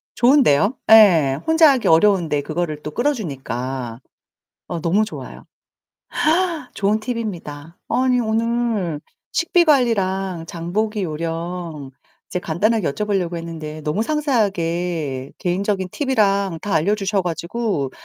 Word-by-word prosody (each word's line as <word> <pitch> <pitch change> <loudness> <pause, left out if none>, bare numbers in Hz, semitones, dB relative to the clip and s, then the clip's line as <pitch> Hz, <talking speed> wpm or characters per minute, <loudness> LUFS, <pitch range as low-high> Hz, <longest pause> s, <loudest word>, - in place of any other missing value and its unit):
좋은데요? 240 - +4 0.2
예, 165 -11 +6
혼자 320 -2 +6
하기 260 -3 0
어려운데 165 -3 +3
그거를 155 0 -3
또 150 - -5
끌어주니까. 135 - -3 0.7
어 170 -2 -4
너무 185 +6 +2
좋아요. - - -9 1.3
좋은 205 +1 +1
팁입니다. 175 -9 -6
아니 250 +1 +2
오늘 225 -7 -1 0.3
식비 345 +1 +3
관리랑 195 - +1
장보기 200 +6 -2
요령 165 -2 -5 0.4
이제 180 - -2
간단하게 195 +4 0
여쭤보려고 195 -3 -1
했는데 160 -2 -7
너무 155 +8 -1
상세하게 175 - -1
개인적인 190 +1 -1
팁이랑 200 - +1
다 205 - -2
알려주셔 195 +4 +1
가지고 175 - -2
185 Hz, 275 characters per minute, -20 LUFS, 160-220 Hz, 1.3 s, 예